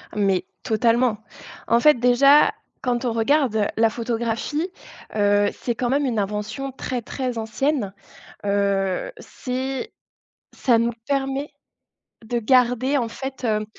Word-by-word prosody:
Mais 195 -3 +1 0.2
totalement. 230 +1 +2 0.5
En 235 - +4
fait, 300 +3 +6
déjà, 275 +4 +5 0.3
quand 245 0 -1
on 240 - 0
regarde 225 -3 +2
la 225 0 +4
photographie, 235 - -2 0.5
heu, 205 -1 +3
c'est 240 -2 -3
quand 245 0 -1
même 280 +3 +1
une 235 -5 0
invention 210 +7 -3
très, 255 -2 -4
très 250 +1 -4
ancienne, 225 -1 -1 0.5
heu, 200 - 0
c'est 265 - -4 0.6
ça 240 -4 +3
nous 230 +1 +1 0.2
permet 275 +1 -1 0.7
de 235 +2 -2
garder, 250 +3 +3
en 240 -4 0
fait, 265 +3 -7
hem. 215 -2 0
240 Hz, 125 wpm, -23 LUFS, 220-270 Hz, 0.7 s, fait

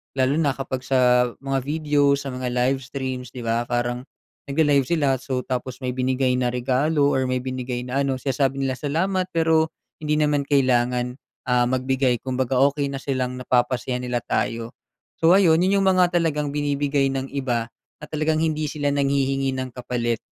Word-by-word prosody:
lalo 130 +1 +2
na 150 -4 +2
kapag 135 -1 -4
sa 125 -1 +3 0.2
mga 135 0 0
video, 145 -2 +2
sa 135 -1 -5
mga 125 0 -4
live 125 +2 +1
streams, 130 -2 -5
'di 125 -2 -8
ba? 115 +1 0
Parang 120 0 -1 0.5
nagla-live 145 -2 +3
sila, 140 -4 +1
so 130 0 -3
tapos 125 0 -4
may 125 - -2
binigay 130 0 +1
na 125 -1 0
regalo, 140 +4 +1
or 130 -1 +1
may 130 0 -1
binigay 125 -1 -4
na 125 +2 -2
ano. 135 -1 -1
Sinasabi 135 0 0
nila 130 -1 -1
salamat, 185 +7 0
pero 160 -1 +2 0.2
hindi 150 0 -1
naman 150 -1 +2
kailangan, 125 -2 +1 0.3
ah, 125 0 +3
magbigay 130 -1 +1
kumbaga 130 -1 -1
okey 140 0 -2
na 135 - -4
silang 130 -2 -2
napapasaya 125 0 0
nila 125 -1 -2
tayo. 115 +1 -2 0.5
So, 165 +2 +6
ayun, 170 -3 +4
'yon, 195 +2 +3
yung - - +1
mga 180 -2 +4
talagang 150 -3 -1
binibigay 145 -1 0
ng 135 0 -3
iba 120 -4 -1 0.3
na - - -6
talagang 155 0 0
hindi 155 -1 0
sila 145 -2 -1
nanghihingi 135 -1 +1
ng 130 0 -3
kapalit. 120 -2 -2
135 Hz, 170 wpm, -23 LUFS, 125-145 Hz, 0.5 s, So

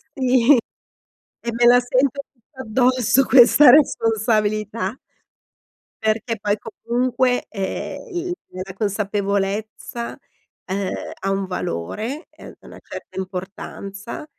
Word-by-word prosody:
Sì, 255 0 +4 0.9
e 235 - -3
me 240 +1 +2
la 245 +1 +7
sento 255 +2 +1
tutta 260 +2 -14
addosso 255 +2 +2
questa 260 +3 +7
responsabilità. 220 -5 +2 1.0
Perché 220 +1 -1
poi 205 0 +1
comunque, 245 +4 -1
ehm, 200 - -5
il 355 +1 -2 0.2
la 185 +1 -7
consapevolezza, 205 +2 -2 0.5
uhm, 190 0 -2 0.3
ha 195 - -2
un 195 0 -1
valore, 190 - -4
ehm, - - -13
una - - -13
certa - - -10
importanza, 195 +4 -7
225 Hz, 100 wpm, -21 LUFS, 200-250 Hz, 1.0 s, la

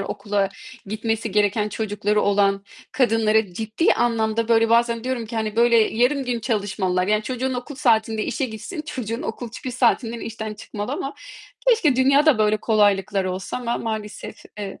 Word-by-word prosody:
okula 200 0 -1 0.4
gitmesi 225 +2 -2
gereken 210 +1 +2
çocukları 210 -1 -1
olan 200 -1 +2 0.3
kadınlara 220 -5 +2
ciddi 220 - +1
anlamda 230 -1 0
böyle 225 0 +4
bazen 235 0 +2
diyorum 255 -3 -2
ki 230 +1 -6
hani, 220 0 -2
böyle 235 0 +5
yarım 245 +5 +2
gün 245 -2 -2
çalışmalılar. 195 -5 -1
Yani, 215 +1 +2
çocuğun 255 +2 -2
okul 250 +4 -6
saatinde 225 -5 +1
işe 275 - -2
gitsin, 260 - -6
çocuğun 235 -2 -4
okul 245 -6 -5
çıkış 255 +1 -6
saatinden 235 -2 +1
işten 220 -1 -5
çıkmalı 210 +3 -6
ama 275 -1 -4 0.5
keşke 380 - +4
dünyada 275 +1 +4
böyle 215 0 +3
kolaylıklar 205 -2 +2
olsa 185 +4 -4
ama 240 -1 -2
maalesef, 220 -2 -5 0.2
evet. 200 -2 -6
225 Hz, 155 wpm, -22 LUFS, 210-245 Hz, 0.5 s, böyle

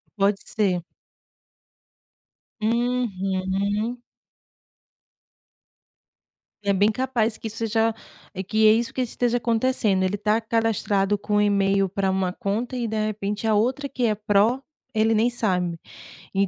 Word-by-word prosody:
Pode 200 -1 +2
ser. 185 -5 0 1.8
Uhum. 210 -2 -1 2.7
É 200 0 +2
bem 205 +3 +3
capaz 235 -2 -1
que 225 - -5
seja, 225 0 0 0.4
é 190 - -4
que 215 +3 +3
é - - +8
isso 230 +1 -1
que 260 - -1
esteja 245 0 0
acontecendo. 230 -4 +1
Ele 185 +2 0
está 210 +2 +1
cadastrado 210 -3 +1
com 210 +1 -2
o 205 - +4
e-mail 195 -1 +2
pra 195 +1 -1
uma 190 -1 0
conta 225 +7 -3
e 240 -2 -1
de 215 0 -1
repente, 210 0 -3
a 220 - +3
outra 255 +7 +1
que 255 -3 -2
é 215 - +2
pró, 210 +4 +2 0.3
ele 220 +1 +3
nem 225 +2 +3
sabe. 180 -8 -1 0.6
E 195 0 +3
215 Hz, 130 wpm, -24 LUFS, 195-230 Hz, 2.7 s, é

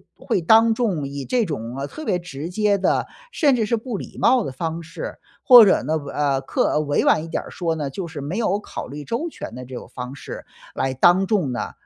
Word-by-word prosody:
会 220 -7 -1
当 225 +6 +5
众 200 - -1
以 140 0 -6
这 250 -2 +1
种 125 - -5
特 310 - -8
别 180 - +1
直 165 -3 -7
接 205 +1 +1
的， 190 - +1 0.2
甚 300 - +2
至 225 - +1
是 235 - +1
不 230 -1 -4
礼 - - -9
貌 255 0 +4
的 135 - -5
方 165 +4 -3
式， 165 - -7 0.3
或 245 -4 +10
者 190 - +3
呢， 155 +4 0 0.2
呃， 140 -2 +1
客 135 - 0
呃， - - +1
委 145 -1 0
婉 155 - +4
一 165 - -7
点 - - -3
儿 - - -11
说 165 -2 -2
呢， 150 -3 -3
就 175 +5 -5
是 160 -4 -7
没 155 +9 -4
有 205 -4 +1
考 - - -7
虑 145 +3 -7
周 235 - -2
全 205 - -8
的 125 +1 -8
这 130 +1 -9
种 - - -8
方 125 +2 -6
式 - - -9 0.3
来 135 0 -1
当 175 +8 +4
众 185 - +1
呢， 125 - -3
170 Hz, 255 characters per minute, -22 LUFS, 140-220 Hz, 0.3 s, 或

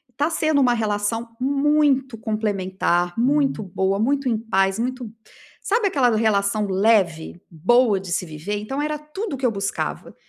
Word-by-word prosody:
tá 295 +4 0
sendo 310 -3 +1
uma 245 -2 +4
relação 225 +1 -2
muito 275 -2 +2
complementar, 195 -4 -1
muito 275 0 +2
boa, 195 0 -1
muito 270 +3 +1
em 225 - +1
paz, 195 -2 0
muito 250 -2 -3 0.5
sabe 430 0 +1
aquela 250 -8 +2
relação 210 -1 +1
leve? 190 -4 +1
Boa 205 +5 +3
de 190 -2 -8
se 180 - -1
viver? 160 +6 -5
Então, 270 +7 -4
era 300 0 -2
tudo 300 +6 -6
o - - -3
que 260 - -3
eu 235 - +3
buscava. 195 -1 -4
225 Hz, 155 wpm, -22 LUFS, 195-275 Hz, 0.5 s, uma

